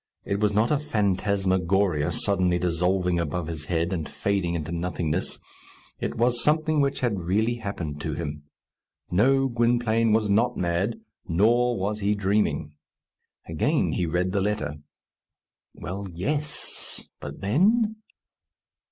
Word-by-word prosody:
It 100 - -1
was 105 -1 +2
not 110 +5 +2
a 150 - +3
phantasmagoria, 95 - +1
suddenly 90 -1 +2
dissolving 90 +1 +1
above 85 +1 -2
his 80 -2 -5
head, 85 +2 0
and 80 -4 -3
fading 95 -4 -1
into 80 -1 -4
nothingness. 85 -2 -2 0.6
It - - -3
was 120 +1 +3
something 155 0 +2
which 140 0 0
had 115 -6 0
really 110 +7 0
happened 85 -9 -5
to 75 0 -3
him. 75 -2 -4 0.7
No, 135 +9 +4
Gwynplaine 115 -2 +2
was 110 0 +3
not 115 +5 +2
mad, 90 - 0 0.3
nor 115 +7 +3
was 105 +3 -2
he 105 +1 +1
dreaming. 100 -6 0 0.7
Again - - +1
he 90 - -1
read 90 +3 0
the 100 0 0
letter. 75 -8 -1 1.0
Well, 95 +3 -5
yes! 145 - -4
But 70 -1 -8
then? 210 - +2
100 Hz, 130 wpm, -26 LUFS, 85-115 Hz, 1.0 s, No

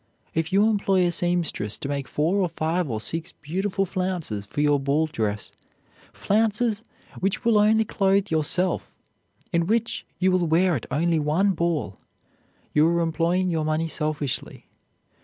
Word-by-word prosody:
If 160 0 -1
you 200 +3 +4
employ 195 -4 +2
a 175 - +1
seamstress 170 -11 0
to - - -6
make 140 -1 -3
four 165 +6 0
or 185 -3 +1
five 165 0 -1
or 110 -2 -2
six 165 +8 -2
beautiful 190 +6 -2
flounces 175 - -3
for 145 - -6
your 145 -1 +3
ball 140 +3 +1
dress, 105 -8 -3 0.6
flounces 220 +1 +1 0.4
which 195 +3 -1
will 225 -2 +4
only 220 +1 +4
clothe 195 -1 +1
yourself, 160 +4 0 0.6
and 170 +1 +1
which 230 +1 0
you 185 +2 +2
will 180 -2 +2
wear 175 +3 +3
at 120 - -5
only 160 +4 +1
one 160 +7 +2
ball, 170 - -1 0.8
you 150 +1 +5
are 170 0 +2
employing 170 +2 +1
your 160 -2 0
money 155 +1 0
selfishly. 150 -4 -3
170 Hz, 155 wpm, -24 LUFS, 150-190 Hz, 0.8 s, you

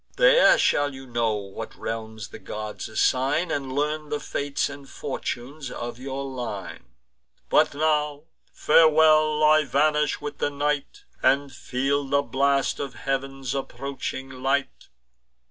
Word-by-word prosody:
There - - +6
shall 145 -1 +2
you 135 0 -10
know 120 -3 0
what 100 -2 -7
realms 110 -2 -6
the - - -10
gods 105 +3 -6
assign, 135 +9 +1
And 135 -2 -2
learn 150 +2 -1
the 150 - -2
fates 140 0 -2
and 140 -1 -10
fortunes 135 +1 -5
of 120 -1 -6
your 135 +1 -4
line. 120 -8 -6 0.6
But - - +3
now, 150 -1 0 0.3
farewell! 155 -1 +5
I 155 0 +6
vanish 150 +2 +1
with 145 0 -6
the - - +1
night, 145 - -2 0.2
And 140 0 +2
feel 135 +3 -1
the 140 +1 +1
blast 140 0 +1
of 135 -4 -5
heav'n's 135 +1 -3
approaching 135 -1 -5
light." 135 +1 -2
140 Hz, 130 wpm, -25 LUFS, 130-150 Hz, 0.6 s, There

